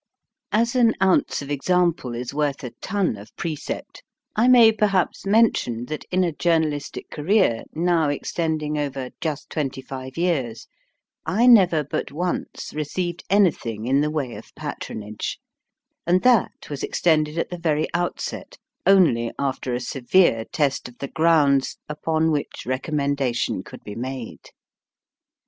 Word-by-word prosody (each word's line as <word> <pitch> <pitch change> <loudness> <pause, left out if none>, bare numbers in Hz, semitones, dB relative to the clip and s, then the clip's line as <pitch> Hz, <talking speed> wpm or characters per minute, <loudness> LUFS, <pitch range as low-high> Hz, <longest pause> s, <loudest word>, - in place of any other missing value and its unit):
As 230 +3 +1
an 235 -3 +4
ounce 190 -6 +2
of 140 - -7
example 165 -4 +1
is 120 +2 -5
worth 145 -2 -1
a 125 - -5
ton 195 - 0
of 100 +1 -12
precept, 160 -4 -5 0.3
I 230 +3 +3
may 240 -3 +8
perhaps 200 -3 0
mention 195 - +2
that 155 - -5
in 185 0 +2
a 175 - +1
journalistic 155 -3 -1
career 155 - +2
now 165 -2 +2
extending 155 0 -2
over 135 -3 -3
just 155 -4 -4
twenty 140 -4 -2
five 130 0 -8
years, 135 -10 -1 0.6
I 225 +5 +2
never 185 -10 +6
but 145 - -4
once 175 +5 -3
received 170 +3 -3
anything 150 - +2
in 135 +3 +3
the 150 - +1
way 145 -6 -2
of - - -12
patronage, 105 0 -5 0.7
and 180 +2 +3
that 245 -5 +2
was 145 - -4
extended 155 -2 +1
at 165 - -2
the 175 - -5
very 155 -2 +1
outset 175 - -3 0.3
only 160 -12 +5
after 130 -2 -2
a - - -1
severe 125 -1 +2
test 140 -1 -1
of 125 - -18
the 140 - -5
grounds 150 -5 +3
upon 160 +1 0
which 145 -2 -3
recommendation 140 -1 -1
could - - -12
be 105 - -7
made. 125 +1 -6
150 Hz, 140 wpm, -23 LUFS, 135-180 Hz, 0.7 s, may